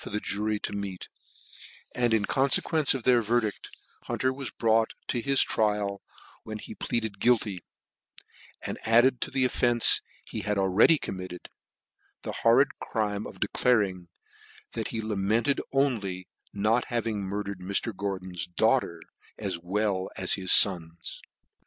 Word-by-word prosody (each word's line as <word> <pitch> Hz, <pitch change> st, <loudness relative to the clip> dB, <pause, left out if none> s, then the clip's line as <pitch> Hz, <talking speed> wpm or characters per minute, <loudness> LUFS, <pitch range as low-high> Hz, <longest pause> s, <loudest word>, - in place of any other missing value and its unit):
the 105 Hz, -, -3 dB
juty 105 Hz, +1 st, -2 dB
to -, -, -5 dB
meet: 100 Hz, -2 st, -6 dB, 0.8 s
and, 120 Hz, -2 st, +1 dB
in 110 Hz, -2 st, +2 dB
confequence 140 Hz, +3 st, +2 dB
of 130 Hz, -, -5 dB
their 125 Hz, -1 st, +4 dB
verdidl, 115 Hz, -1 st, +1 dB, 0.5 s
i^unter 130 Hz, 0 st, -1 dB
was 135 Hz, -1 st, -4 dB
brought 110 Hz, 0 st, +1 dB
to 120 Hz, -, -1 dB
his 135 Hz, +2 st, +4 dB
trial, 105 Hz, -2 st, -1 dB, 0.4 s
when 110 Hz, 0 st, -7 dB
he 110 Hz, -, -9 dB
pleaded 110 Hz, -3 st, -3 dB
guilty, 110 Hz, -7 st, +1 dB, 1.0 s
and -, -, -4 dB
added 120 Hz, +3 st, +4 dB
to -, -, -1 dB
the 130 Hz, -1 st, +1 dB
offence 120 Hz, -2 st, +4 dB, 0.2 s
he -, -, -6 dB
had 105 Hz, -1 st, -2 dB
already 95 Hz, -, +4 dB
committed, 90 Hz, -7 st, -7 dB, 0.7 s
the -, -, -4 dB
horrid 120 Hz, +5 st, +5 dB, 0.2 s
c:ime 105 Hz, -2 st, -1 dB
of -, -, -12 dB
de -, -, 0 dB
claring, 100 Hz, -8 st, +1 dB, 0.6 s
that 110 Hz, -2 st, -4 dB
he 115 Hz, -1 st, -4 dB
lamented 110 Hz, +6 st, 0 dB
only 135 Hz, -3 st, +2 dB
the 95 Hz, -2 st, -6 dB, 0.3 s
not 110 Hz, +4 st, +2 dB
having 115 Hz, -3 st, -2 dB
mur 100 Hz, +2 st, -3 dB
dered 100 Hz, -2 st, -7 dB
Mr. 100 Hz, +3 st, -2 dB
Gordon's 95 Hz, -4 st, -4 dB
daughter 85 Hz, -1 st, 0 dB, 0.3 s
as 95 Hz, -5 st, -3 dB
well 95 Hz, +1 st, -1 dB
as 95 Hz, -, 0 dB
his 95 Hz, -2 st, +1 dB
ions. 85 Hz, -4 st, -8 dB
105 Hz, 145 wpm, -27 LUFS, 95-120 Hz, 1.0 s, horrid